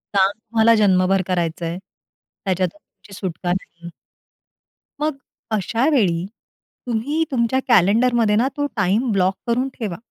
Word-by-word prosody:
काम 195 0 +4
तुम्हाला 225 0 +3
जन्मभर 190 -2 +3
करायचंय, 170 -1 -2 0.7
त्याच्यातून 185 -1 -1
तुमची 200 - -20
सुटका 180 -2 -3
नाही. 170 -2 -5 1.1
मग 300 -1 -1 0.4
अशा 230 +7 0
वेळी 180 - +2 0.6
तुम्ही 250 +7 -1
तुमच्या 255 0 +1
कॅलेंडरमध्ये 225 +1 +4
ना, 240 +4 +3
तो 290 0 0
टाइम 210 +5 +1
ब्लॉक 190 -1 +2
करून 245 +3 0
ठेवा. 205 -7 -3
210 Hz, 120 wpm, -21 LUFS, 185-235 Hz, 1.1 s, काम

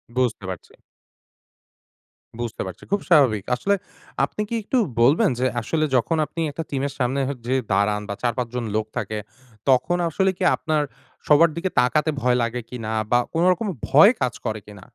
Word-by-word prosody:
বুঝতে 125 -5 0
পারছি। 90 - -8 1.7
বুঝতে 120 -2 -4
পারছি। 95 - -9
খুব 200 - +1
স্বাভাবিক। 130 - +4
আসলে 200 +10 +1 0.5
আপনি 210 - -6
কি 235 - -2
একটু 255 - 0 0.2
বলবেন 150 - +5
যে 130 - +1 0.2
আসলে 155 +6 0
যখন 125 +7 +1
আপনি 165 - -9
একটা 165 +3 -4
টিমের 140 0 -2
সামনে 130 +2 0
হ - - -1
যেয়ে 130 +1 +1
দাঁড়ান 105 +1 +2
বা - - -1
৪-৫ 120 0 -1
লোক 110 -1 0
থাকে, 110 - -3 0.5
তখন 155 +7 +3
আসলে 190 +5 +1
কি - - -3
আপনার 155 -2 0 0.4
সবার 160 +3 +6
দিকে 185 +2 -2
তাকাতে 150 +5 +2
ভয় 125 0 +3
লাগে 115 +1 -2
কিনা 115 -3 -5 0.2
বা 120 - +5
কোনোরকম 180 +6 +2 0.2
ভয় 155 - +8
কাজ 125 -2 +1
করে 110 -1 -2
কিনা? 100 -3 -12
130 Hz, 165 wpm, -23 LUFS, 115-165 Hz, 1.7 s, ভয়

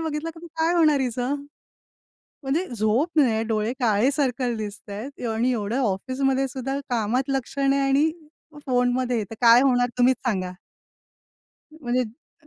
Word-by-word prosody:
बघितलं 320 0 -3
की 335 +1 -11
काय 325 +1 0
होणार 310 -4 +4
हिचं? 250 +1 -1 1.1
म्हणजे 300 +8 -1
झोप 220 +9 +1
नाही, 235 -7 +3
डोळे 220 +1 -1
काळे 230 +2 +3
सर्कल 255 -4 0
दिसतायत 215 +4 -7
आणि 225 +3 +1
एवढं 225 +1 -1
ऑफिसमध्ये 260 +5 0
सुद्धा 270 +1 -4
कामात 245 +3 0
लक्ष 270 0 -3
नाही 275 0 +2
आणि 275 +3 +3 0.6
फोनमध्ये 250 -1 +1
आहे 220 - 0
तर 225 - -7
काय 235 +1 +7
होणार? 245 -2 +3
तुम्हीच 250 +1 +4
सांगा. 185 -5 -1 1.3
म्हणजे 250 -2 0 0.4
अ - - -24
255 Hz, 140 wpm, -24 LUFS, 230-275 Hz, 1.3 s, काय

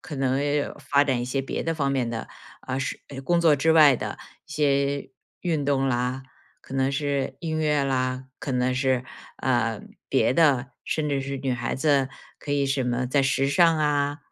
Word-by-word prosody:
可 155 -4 -8
能 135 0 +1 0.4
发 140 0 +3
展 130 -4 0
一 - - -2
些 135 +2 -1
别 - - -3
的 165 0 -1
方 140 -3 0
面 125 -3 0
的， 115 -1 -4 0.4
呃， 130 0 -2
是 - - -4
哎， 135 -1 -7
工 175 +5 +1
作 165 -3 +5
之 160 +3 +2
外 150 -4 +7
的 - - -5 0.3
一 - - -20
些 140 -1 0 0.3
运 160 -5 0
动 135 -1 +1
啦， 125 +1 -1 0.4
可 - - -13
能 135 0 +1
是 140 -2 -1
音 160 -1 -2
乐 150 -2 +1
啦， 130 -1 -1
可 - - -5
能 125 0 +1
是， 130 -1 +1 0.3
呃， 115 -4 0 0.3
别 130 - +2
的， 140 -6 +3 0.2
甚 155 -2 -1
至 140 -1 0
是 140 0 -4
女 130 -1 -1
孩 120 0 -3
子 140 -2 +2 0.3
可 145 - -4
以 140 -1 +1
什 135 -1 0
么 125 +1 -1
在 140 +2 +2
时 135 0 +1
尚 165 +1 +4
啊、 145 -1 +1
140 Hz, 210 characters per minute, -25 LUFS, 130-145 Hz, 0.4 s, 外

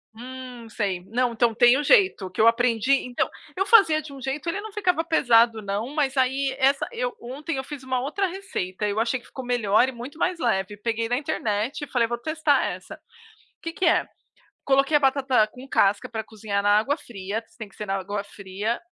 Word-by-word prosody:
Hum, 250 -1 -9
sei, 195 -5 -2
não, 240 +3 0
então 230 0 +2
tem 245 +3 +5
o - - -1
jeito 375 - +3
que 185 - -1
eu 225 - +6
aprendi. 235 +2 +3
Então, 250 -1 -1 0.3
eu 385 +1 0
fazia 390 -8 +5
de 305 - -11
um 275 - -10
jeito, 270 +5 -3
ele 390 - -2
não 435 0 -8
ficava 360 -6 0
pesado 235 -8 +3
não, 210 +7 -3
mas 280 -3 0
aí 265 +1 +1
essa 275 +1 +2
eu, 485 0 -3
ontem, 275 +5 -5
eu 265 - -3
fiz 280 -1 -8
uma 260 -1 -1
outra 345 +9 -1
receita. 340 - -4
Eu 205 +2 -1
achei 235 +3 0
que - - -19
ficou 260 -2 -8
melhor 240 -1 +3
e - - -3
muito 250 +5 -9
mais 350 +1 0
leve. 205 - -1
Peguei 230 +1 -2
na 245 +1 0
internet 255 -3 -2
e - - -21
falei: 240 -3 +1
"Vou 240 0 -3
testar 310 +2 +1
essa." - - -6 0.6
Que 330 - -4
que 365 - -1
é; - - +3 0.6
coloquei 275 +2 +4
a - - 0
batata 265 -5 +2
com 250 +5 -13
casca 200 -5 +2
pra 220 -2 -4
cozinhar 210 -2 -3
na 205 +1 +4
água 280 +7 -1
fria, 205 - -5 0.2
tem 215 -3 -8
que - - -22
ser 210 - -6
na 195 0 -1
água 200 +1 -3
fria, 200 +3 -4
250 Hz, 210 wpm, -24 LUFS, 220-290 Hz, 0.6 s, eu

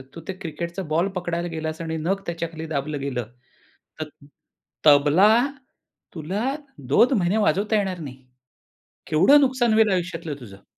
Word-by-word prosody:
"तू 165 - -8
ते 190 - -3
क्रिकेटचा 170 +3 -5
बॉल 170 +4 +2
पकडायला 175 -1 -2
गेलास 160 0 -4
आणि 160 -1 -3
नख 190 +5 -1
त्याच्याखाली 165 -1 -5
दाबलं 145 0 -2
गेलं 125 -5 -3 0.7
तर 155 -1 -4 0.8
तबला 150 +7 +6 0.9
तुला 180 +7 -3 0.5
2 240 - +5
महिने 180 +5 +1
वाजवता 210 +2 +2
येणार 190 -3 -1
नाही. 135 -4 -8 0.9
केवढं 195 - +6
नुकसान 255 -4 +2
होईल 220 -1 +4
आयुष्यातलं 175 -4 -2
तुझं?" 100 -5 -13
170 Hz, 135 wpm, -23 LUFS, 155-195 Hz, 0.9 s, तबला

